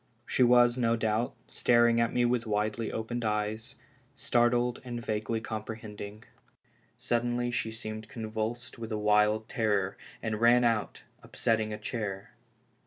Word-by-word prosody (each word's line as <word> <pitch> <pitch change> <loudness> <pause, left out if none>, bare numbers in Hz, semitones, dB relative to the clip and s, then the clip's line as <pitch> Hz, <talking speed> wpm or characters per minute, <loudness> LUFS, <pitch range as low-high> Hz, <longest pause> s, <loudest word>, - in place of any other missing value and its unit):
She - - -1
was, 120 0 +5
no 115 -1 +3
doubt, 110 +1 0
staring 120 -1 +3
at 115 - +1
me 120 - +2
with 120 -1 0
widely 105 +1 -1
opened 120 +2 -3
eyes, 105 0 -2 0.4
startled 120 0 +1
and 120 -2 -5
vaguely 110 0 -2
comprehending. 110 -1 -7 0.7
Suddenly 120 +1 0
she 120 -2 -1
seemed 110 -1 -7
convulsed 110 +2 -4
with 115 0 -6
a 110 - -1
wild 105 +1 +3
terror, 105 -6 0 0.2
and 110 -1 -3
ran 120 +1 +6
out, 115 -3 0 0.2
upsetting 110 -1 0
a 105 - -4
chair. 100 -5 -4
115 Hz, 135 wpm, -29 LUFS, 110-120 Hz, 0.7 s, ran